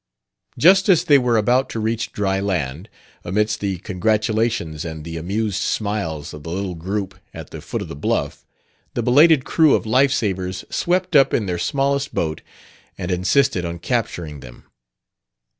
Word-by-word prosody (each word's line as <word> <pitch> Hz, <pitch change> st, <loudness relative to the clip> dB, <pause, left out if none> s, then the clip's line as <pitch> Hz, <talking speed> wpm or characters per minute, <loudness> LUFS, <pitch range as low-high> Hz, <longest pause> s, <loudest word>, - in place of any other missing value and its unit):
Just 190 Hz, +4 st, +5 dB
as 180 Hz, -5 st, +5 dB
they 145 Hz, -2 st, +5 dB
were 120 Hz, -2 st, +2 dB
about 125 Hz, +5 st, +2 dB
to 115 Hz, -, -4 dB
reach 110 Hz, +1 st, -2 dB
dry 95 Hz, -1 st, -1 dB
land, 90 Hz, -, -3 dB, 0.3 s
amidst 105 Hz, +4 st, 0 dB
the 100 Hz, -2 st, -2 dB
congratulations 110 Hz, -3 st, -1 dB
and 80 Hz, -2 st, -6 dB
the 85 Hz, 0 st, -6 dB
amused 100 Hz, +4 st, -2 dB
smiles 100 Hz, -9 st, -2 dB
of 75 Hz, -, -9 dB
the 80 Hz, -, -8 dB
little 95 Hz, +1 st, -3 dB
group 95 Hz, +4 st, -4 dB, 0.2 s
at -, -, -9 dB
the -, -, -8 dB
foot -, -, -4 dB
of -, -, -9 dB
the -, -, -7 dB
bluff, 70 Hz, -, -2 dB, 0.5 s
the 120 Hz, -, -1 dB
belated 145 Hz, +3 st, +5 dB
crew 160 Hz, -3 st, +4 dB
of -, -, -2 dB
life 130 Hz, +5 st, +3 dB
savers 95 Hz, -6 st, -2 dB
swept 180 Hz, 0 st, 0 dB
up 135 Hz, -2 st, +5 dB
in 110 Hz, -, 0 dB
their 90 Hz, -2 st, -2 dB
smallest 140 Hz, -, -1 dB
boat 80 Hz, -2 st, -2 dB, 0.6 s
and 90 Hz, -, -4 dB
insisted 95 Hz, +4 st, +2 dB
on 85 Hz, 0 st, -4 dB
capturing 85 Hz, -, -3 dB
them. -, -, -13 dB
105 Hz, 165 wpm, -21 LUFS, 90-125 Hz, 0.6 s, Just